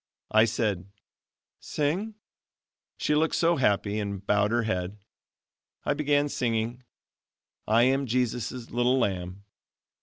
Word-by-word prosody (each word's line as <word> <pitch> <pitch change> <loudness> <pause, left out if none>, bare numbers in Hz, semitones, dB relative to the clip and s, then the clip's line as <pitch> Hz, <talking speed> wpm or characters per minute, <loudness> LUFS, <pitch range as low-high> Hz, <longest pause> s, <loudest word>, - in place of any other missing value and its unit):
I 110 +1 +6
said 105 -5 -1 0.7
"Sing?" 185 +9 -2 0.8
She - - 0
looked 155 +2 +2
so 170 0 +3
happy 105 -4 +1
and 100 -2 -4
bowed 105 +1 +2
her 120 +1 +1
head. 95 -2 -2 0.9
I - - +2
began 145 -1 +2
singing: 120 -2 -1 0.9
"I 115 +2 +5
am 135 +2 +2
Jesus' 125 0 -2
little 120 +2 +2
lamb." 95 -4 -2
115 Hz, 115 wpm, -27 LUFS, 105-135 Hz, 0.9 s, I